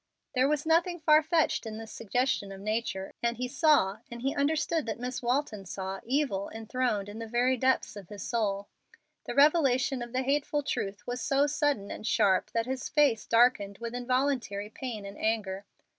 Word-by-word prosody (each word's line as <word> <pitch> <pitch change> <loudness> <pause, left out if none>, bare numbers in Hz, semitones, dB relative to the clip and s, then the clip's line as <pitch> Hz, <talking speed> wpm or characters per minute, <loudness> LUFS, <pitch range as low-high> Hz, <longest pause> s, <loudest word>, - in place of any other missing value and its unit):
There 260 +1 +3
was 300 0 0
nothing 340 +2 +2
far 310 0 +5
fetched 315 -6 +1
in 215 0 -6
this 225 0 -8
suggestion 230 -2 -1
of 195 - -8
nature, 215 -2 -3
and 235 -1 0
he 250 +1 -2
saw 270 - +3
and 235 0 -8
he 270 - +1
understood 300 +1 0
that 220 -2 -2
Miss 250 +1 -4
Walton 245 -4 -1
saw 190 +1 -5
evil 250 -7 0
enthroned 225 -2 -2
in 205 +2 -8
the 225 - -5
very 245 +3 +2
depths 260 -2 +1
of 200 -4 -10
his 205 -2 -7
soul. 205 -3 -1 0.6
The - - -5
revelation 275 -4 +4
of 240 0 -6
the 260 +1 0
hateful 290 +2 0
truth 200 -6 -3
was 245 0 -4
so 275 +4 +2
sudden 290 -8 0
and 215 - -6
sharp 210 -6 +3
that 230 -1 +1
his 260 +1 -4
face 280 -8 +3
darkened 230 -4 +3
with 235 0 -6
involuntary 245 -5 -1
pain 225 -4 -6
and 200 +1 -9
anger. 205 -3 -1
240 Hz, 185 wpm, -29 LUFS, 210-275 Hz, 0.6 s, far